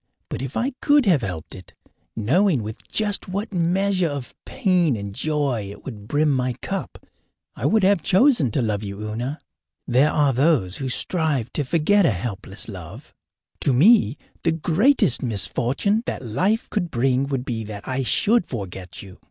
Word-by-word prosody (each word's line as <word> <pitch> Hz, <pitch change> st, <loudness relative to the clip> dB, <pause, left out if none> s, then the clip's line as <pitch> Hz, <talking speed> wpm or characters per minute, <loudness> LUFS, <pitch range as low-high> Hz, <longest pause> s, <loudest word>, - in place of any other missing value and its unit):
But -, -, -4 dB
if 135 Hz, 0 st, -5 dB
I 255 Hz, +4 st, 0 dB
could 290 Hz, -2 st, +4 dB
have 170 Hz, -9 st, +4 dB
helped 85 Hz, -7 st, -5 dB
it, 95 Hz, -3 st, -13 dB, 0.4 s
knowing 140 Hz, -, +2 dB
with 110 Hz, +2 st, -8 dB
just 210 Hz, -2 st, -1 dB
what 200 Hz, +3 st, -4 dB
measure 185 Hz, +1 st, +1 dB
of 140 Hz, -4 st, -6 dB
pain 180 Hz, -, +1 dB
and 100 Hz, -1 st, -6 dB
joy 140 Hz, -6 st, -1 dB
it 100 Hz, -, -12 dB
would 105 Hz, -6 st, -8 dB
brim 150 Hz, +4 st, +2 dB
my 130 Hz, -2 st, 0 dB
cup, 195 Hz, +10 st, -6 dB, 0.5 s
I -, -, -1 dB
would 220 Hz, -2 st, +2 dB
have 195 Hz, -2 st, +4 dB
chosen 190 Hz, -, +4 dB
to 125 Hz, +4 st, -1 dB
love 105 Hz, -2 st, -1 dB
you, 100 Hz, -1 st, -6 dB
Una. 120 Hz, +8 st, -4 dB, 0.5 s
There 130 Hz, +4 st, +3 dB
are 145 Hz, -3 st, +2 dB
those 125 Hz, -, +2 dB
who 135 Hz, -2 st, -3 dB
strive 145 Hz, -4 st, -1 dB
to 150 Hz, -, -1 dB
forget 170 Hz, +8 st, +3 dB
a -, -, +2 dB
hopeless 95 Hz, +1 st, -4 dB
love. -, -, -10 dB, 0.5 s
To 140 Hz, -, +1 dB
me, 155 Hz, -, +5 dB, 0.3 s
the 165 Hz, -, +2 dB
greatest 180 Hz, -, +3 dB
misfortune 130 Hz, -, 0 dB
that 130 Hz, -, -4 dB
life 185 Hz, -, 0 dB
could 175 Hz, -5 st, -1 dB
bring 130 Hz, +1 st, +1 dB
would 135 Hz, -2 st, -3 dB
be 115 Hz, -3 st, -3 dB
that 105 Hz, -1 st, -8 dB
I 130 Hz, +1 st, -1 dB
should 205 Hz, -, +2 dB
forget 95 Hz, -6 st, -7 dB
you. 95 Hz, -2 st, -13 dB
140 Hz, 170 wpm, -22 LUFS, 115-185 Hz, 0.5 s, me